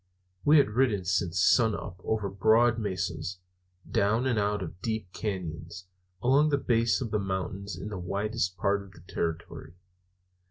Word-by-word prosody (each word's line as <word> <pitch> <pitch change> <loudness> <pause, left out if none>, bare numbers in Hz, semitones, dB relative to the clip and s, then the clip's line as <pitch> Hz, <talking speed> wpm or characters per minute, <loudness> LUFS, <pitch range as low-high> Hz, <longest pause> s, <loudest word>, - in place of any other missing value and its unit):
We 150 +2 +6
had 140 -7 +4
ridden 110 -5 +1
since 95 0 0
sunup 100 -3 +2
over 110 -2 -1
broad 110 +4 +3
mesas, 95 -2 -3 0.5
down 110 +5 +1
and 120 -5 +1
out 105 -1 0
of 90 +1 -9
deep 110 -4 -3
cañons, 90 -4 -5 0.4
along 140 +5 +4
the 145 - +2
base 115 -2 +2
of 115 -4 -3
the 105 - +1
mountains 95 0 -3
in 100 +4 -6
the 100 -3 -5
wildest 95 0 -2
parts 100 +2 +1
of 95 - -16
the - - -15
territory. 80 0 -4
100 Hz, 155 wpm, -28 LUFS, 95-110 Hz, 0.5 s, We